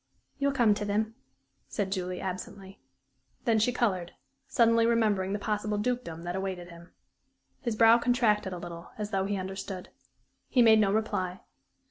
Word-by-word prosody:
"You'll 280 Hz, 0 st, +2 dB
come 240 Hz, -6 st, +4 dB
to 205 Hz, -, -3 dB
them," 215 Hz, +2 st, -1 dB, 0.5 s
said 200 Hz, -3 st, -3 dB
Julie, 185 Hz, -2 st, -2 dB
absently. 190 Hz, +1 st, -6 dB, 0.7 s
Then 225 Hz, -2 st, +3 dB
she 225 Hz, +4 st, +3 dB
colored, 190 Hz, -8 st, -1 dB, 0.3 s
suddenly 230 Hz, -2 st, +4 dB
remembering 210 Hz, -5 st, +2 dB
the 205 Hz, -, 0 dB
possible 210 Hz, 0 st, -2 dB
dukedom 210 Hz, -7 st, -2 dB
that 175 Hz, +1 st, -3 dB
awaited 190 Hz, -2 st, -4 dB
him. 170 Hz, 0 st, -13 dB, 0.7 s
His 235 Hz, -5 st, -2 dB
brow 225 Hz, +1 st, +6 dB
contracted 230 Hz, -5 st, +2 dB
a 180 Hz, -, -4 dB
little, 170 Hz, -1 st, -8 dB
as 210 Hz, -1 st, -4 dB
though 190 Hz, -1 st, 0 dB
he 200 Hz, 0 st, -1 dB
understood. 190 Hz, 0 st, -6 dB, 0.6 s
He 245 Hz, -, +5 dB
made 220 Hz, -1 st, +7 dB
no 200 Hz, -2 st, +3 dB
reply. 190 Hz, -4 st, -1 dB
205 Hz, 155 wpm, -29 LUFS, 185-225 Hz, 0.7 s, made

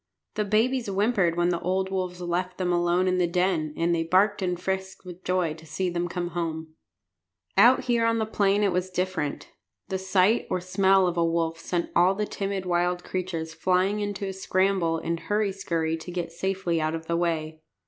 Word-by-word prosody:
The 210 Hz, -, -1 dB
babies 230 Hz, +4 st, +1 dB
whimpered 195 Hz, -4 st, +1 dB
when 175 Hz, 0 st, +2 dB
the 170 Hz, -1 st, 0 dB
old 190 Hz, +2 st, -1 dB
wolves 185 Hz, -2 st, -3 dB
left 180 Hz, +1 st, -2 dB
them 180 Hz, -1 st, 0 dB
alone 175 Hz, +1 st, +2 dB
in 185 Hz, 0 st, +1 dB
the 175 Hz, -, +3 dB
den; 175 Hz, -3 st, 0 dB
and 170 Hz, +1 st, +1 dB
they 165 Hz, -, +1 dB
barked 195 Hz, +5 st, +2 dB
and 180 Hz, -2 st, -1 dB
frisked 190 Hz, +1 st, -4 dB
with 180 Hz, 0 st, -10 dB
joy 180 Hz, -3 st, 0 dB
to 160 Hz, +1 st, -14 dB
see 175 Hz, +4 st, -2 dB
them 175 Hz, 0 st, -1 dB
come 175 Hz, 0 st, -3 dB
home 165 Hz, -2 st, -2 dB, 1.0 s
again. -, -, +7 dB
Out 255 Hz, -, +3 dB
here 235 Hz, -2 st, +2 dB
on 230 Hz, 0 st, +2 dB
the 220 Hz, -, 0 dB
plain 205 Hz, -1 st, +2 dB
it 200 Hz, -, +3 dB
was 180 Hz, +1 st, -1 dB
different. 180 Hz, -5 st, -3 dB, 0.4 s
The 190 Hz, -, -2 dB
sight 190 Hz, +4 st, +2 dB
or 185 Hz, -, 0 dB
smell 190 Hz, +1 st, +3 dB
of 175 Hz, -1 st, -1 dB
a 170 Hz, -, +3 dB
wolf 165 Hz, 0 st, 0 dB
sent 175 Hz, 0 st, -2 dB
all 180 Hz, +3 st, +4 dB
the 210 Hz, +1 st, -1 dB
timid 195 Hz, -2 st, -3 dB
wild 180 Hz, 0 st, 0 dB
creatures 170 Hz, -3 st, -4 dB
flying 185 Hz, +4 st, +1 dB
in 205 Hz, -1 st, -2 dB
a 195 Hz, -, -2 dB
scramble 185 Hz, -3 st, +1 dB
and 165 Hz, +1 st, -3 dB
hurry 210 Hz, +1 st, 0 dB
skurry 165 Hz, -4 st, -2 dB
to 160 Hz, -, -9 dB
get 175 Hz, -2 st, -4 dB
safely 180 Hz, -1 st, -1 dB
out 155 Hz, +1 st, 0 dB
of 160 Hz, 0 st, -6 dB
the 170 Hz, -, -1 dB
way. 160 Hz, -2 st, -1 dB
180 Hz, 205 wpm, -26 LUFS, 170-195 Hz, 1.0 s, again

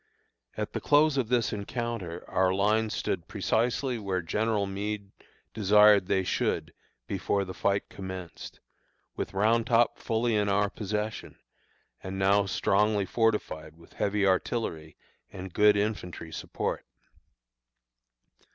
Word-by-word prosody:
At -, -, -3 dB
the -, -, -3 dB
close 150 Hz, 0 st, +4 dB
of 130 Hz, -5 st, 0 dB
this 120 Hz, -2 st, +1 dB
encounter 105 Hz, -5 st, -4 dB
our 95 Hz, 0 st, +2 dB
lines 105 Hz, +3 st, +1 dB
stood -, -, -2 dB
precisely 120 Hz, +2 st, 0 dB
where 95 Hz, -4 st, -2 dB
General 105 Hz, +4 st, 0 dB
Meade 100 Hz, 0 st, -4 dB, 0.4 s
desired 105 Hz, -2 st, +5 dB
they 95 Hz, -1 st, +1 dB
should 90 Hz, -, -1 dB, 0.4 s
be -, -, -3 dB
before 100 Hz, -1 st, 0 dB
the 95 Hz, -, -7 dB
fight 100 Hz, +2 st, 0 dB
commenced, 95 Hz, -3 st, -8 dB, 0.5 s
with -, -, -5 dB
Round 110 Hz, +3 st, +2 dB
Top 120 Hz, 0 st, +3 dB
fully 115 Hz, +1 st, 0 dB
in 105 Hz, -1 st, +1 dB
our 100 Hz, +1 st, +2 dB
possession 105 Hz, +1 st, -4 dB, 0.6 s
and 95 Hz, 0 st, -6 dB
now 100 Hz, +1 st, +3 dB
strongly 100 Hz, +1 st, +2 dB
fortified 95 Hz, -8 st, -1 dB
with 85 Hz, -, -18 dB
heavy 100 Hz, 0 st, 0 dB
artillery 95 Hz, -5 st, -1 dB, 0.3 s
and 95 Hz, -2 st, -8 dB
good 105 Hz, 0 st, +5 dB
infantry 95 Hz, -6 st, -3 dB
support. -, -, -4 dB
105 Hz, 125 wpm, -28 LUFS, 95-110 Hz, 0.6 s, desired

